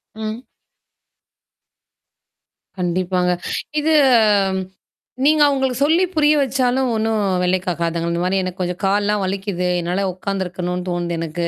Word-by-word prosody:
ம். 220 +3 -6 2.3
கண்டிப்பாங்க. 180 0 0 0.5
இது. 320 +1 +2 1.3
நீங்க 305 +1 +4
அவங்களுக்கு 265 -3 0
சொல்லி 325 +5 +3
புரிய 300 -1 +4
வச்சாலும் 260 -1 +1
ஒண்ணும் 220 -1 0 0.2
வேலைக் 185 +1 0
காக்காதுங்கள. 170 -1 -1
இந்த 170 - -1
மாரி 190 +1 +1
எனக்கு 185 +1 -6
கொஞ்சம் 180 +1 -3
கால்லாம் 205 +1 +1
வலிக்குது. 190 -1 -2
என்னால 180 +3 -1
உட்காந்துருக்கணும்னு 180 -1 -4
தோணுது 175 -1 -2
எனக்கு. 165 +1 -3
190 Hz, 110 wpm, -20 LUFS, 180-230 Hz, 2.3 s, நீங்க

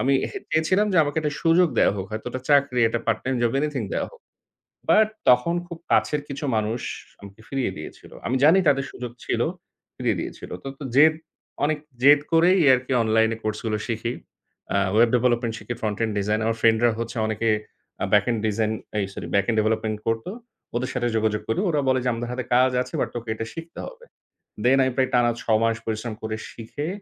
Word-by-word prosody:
আমি 135 - +2 0.4
চেয়েছিলাম 175 +6 +2
যে - - +1
আমাকে 145 +1 -3
একটা 150 -2 -1
সুযোগ 170 +2 +4
দেয়া - - +4
হোক, 95 -1 -4
হয়তো 110 +2 -6
ওটা 130 - -5
চাকরি, 140 -3 +3
একটা 115 +1 -2
পার্ট 115 -1 +2
টাইম 130 +1 0
জব, 120 -1 +2
এনিথিং 145 -3 -1
দেয়া - - -1
হোক। - - -18 0.7
বাট 215 0 +6 0.2
তখন 125 +7 +4
খুব 170 -1 -8
কাছের 150 - +2
কিছু 140 +2 -6
মানুষ 110 +2 -1 0.4
আমাকে 100 +1 -13
ফিরিয়ে 135 -7 -1
দিয়েছিল। 75 - -10 0.2
আমি 130 - 0
জানি 165 +6 +7
তাদের 135 -1 +3
সুযোগ 125 -1 -7
ছিল, - - -1 0.6
ফিরিয়ে - - 0
দিয়েছিল। - - -7
তো, - - -6
তো 150 - -7
জেদ, 155 +3 +6 0.5
অনেক 150 0 +1 0.2
জেদ 145 +2 +7
করেই 175 +3 +5
আরকি 130 +1 0
অনলাইন 110 0 +3
কোর্স 110 0 -2
গুলো 110 -1 0
শিখি। 115 +1 -2 0.6
আ - - +3 0.2
ওয়েব 115 +2 +5
ডেভেলপমেন্ট 120 -1 +1
শিখি, 120 - -5
ফ্রন্ট 105 -2 -2
এন্ড 110 -1 0
ডিজাইন। 105 +2 0
আমার 115 0 0
ফ্রেন্ড 110 0 +4
রা 120 - +6
হচ্ছে 115 +2 -5
অনেকে 110 +1 -1 0.5
আ - - +2
ব্যাক 105 -1 +5
এন্ড 115 -2 0
ডিজাইন 110 0 0 0.3
এই 100 - +1
সরি - - -7
ব্যাক 100 0 +3
এন্ড 115 - +1
ডেভেলপমেন্ট 110 0 0
করতো। 115 +8 -1 0.5
ওদের 125 +1 -2
সাথে 120 -1 0
যোগাযোগ 110 -1 0
করি। 115 - 0
ওরা 150 -4 +1
বলে 130 0 +3
যে - - +1
আমাদের 120 +1 -4
হাতে 125 0 -3
কাজ 130 +1 +5
আছে - - -12
বাট - - 0
তোকে 120 -1 -6
এটা 115 0 -5
শিখতে 165 +1 -9
হবে। 485 -1 -12 0.6
Then 130 +2 +5
আমি 130 - 0
প্রায় 130 -1 +1
টানা 120 -1 +4
৬ 110 -1 +2
মাস 115 0 +2
পরিশ্রম 110 +1 -3
করে 110 0 -3
শিখে 120 +6 -6
120 Hz, 205 wpm, -24 LUFS, 110-140 Hz, 0.7 s, জানি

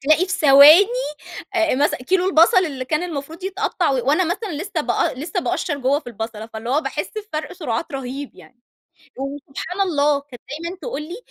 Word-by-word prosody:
تلاقي 310 +6 +3
في 385 - -4
ثواني 305 +3 +8 0.7
آآ 330 -5 +2
مثلًا 290 +3 +1
كيلو 370 +6 +1
البصل 340 +1 +5
اللي 270 -4 -5
كان 305 +5 -1
المفروض 325 +1 -6
يتقطّع 385 -3 -1
و - - +1
وأنا 310 +6 +3
مثلًا 370 +4 -3
لسّه 400 - -3
بأ - - 0
لسّه 305 +6 -3
باقشّر 290 -2 -2
جوّه 270 +2 +1
في - - -30
البصلة، 225 -1 -6
فاللي 225 +1 -7
هو 285 +4 +2
باحِس - - -4
بفَرْق 355 -8 -5
سُرعات 290 -6 -4
رهيب 270 +1 -5
يعني. 245 -1 -18 0.6
وسبحان 280 +6 -6
الله 295 -6 +2
كانت 270 -4 -14
دايمًا 335 +5 -5
تقول 485 -11 -4
لي: 340 +5 -7
300 Hz, 180 wpm, -21 LUFS, 275-360 Hz, 0.7 s, ثواني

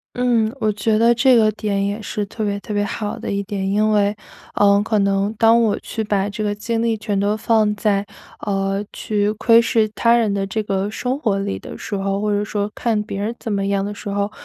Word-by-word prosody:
嗯， 240 -2 +1
我 215 -1 +1
觉 215 +2 0
得 230 +2 +4
这 255 +1 +5
个 215 -2 +4
点 200 -2 -1
也 200 +2 -2
是 210 -1 -3
特 215 +2 -4
别 200 0 -1
特 210 - -9
别 205 0 0
好 210 0 -4
的 - - -5
一 200 0 -1
点， 195 -1 -3
因 210 +2 +2
为， 205 0 +2 0.4
呃， 200 0 +4
可 215 -1 0
能 200 +1 +1
当 230 +1 +6
我 220 -3 +1
去 220 - -4
把 205 -1 0
这 210 +1 -4
个 205 -1 0
精 225 +2 -2
力 230 -1 +1
全 210 -2 -2
都 205 +2 +1
放 215 -1 +2
在， 205 -1 0 0.4
呃， 195 0 -1
去 210 -1 -1
窥 230 +2 +4
视 225 -2 +2
他 235 0 +4
人 225 -3 +2
的 200 -1 -1
这 205 +3 -2
个 195 -1 -1
生 250 +4 -2
活 215 -9 0
里 195 0 -2
的 - - -9
时 205 - -4
候， 195 +1 -1
或 210 - 0
者 205 0 0
说 205 -1 -2
看 225 -3 0
别 200 -1 -5
人 220 +4 -2
怎 225 - -5
么 200 -1 0
样 200 0 0
的 205 - -3
时 210 - -9
候， 200 +1 -1
210 Hz, 255 characters per minute, -20 LUFS, 200-220 Hz, 0.4 s, 当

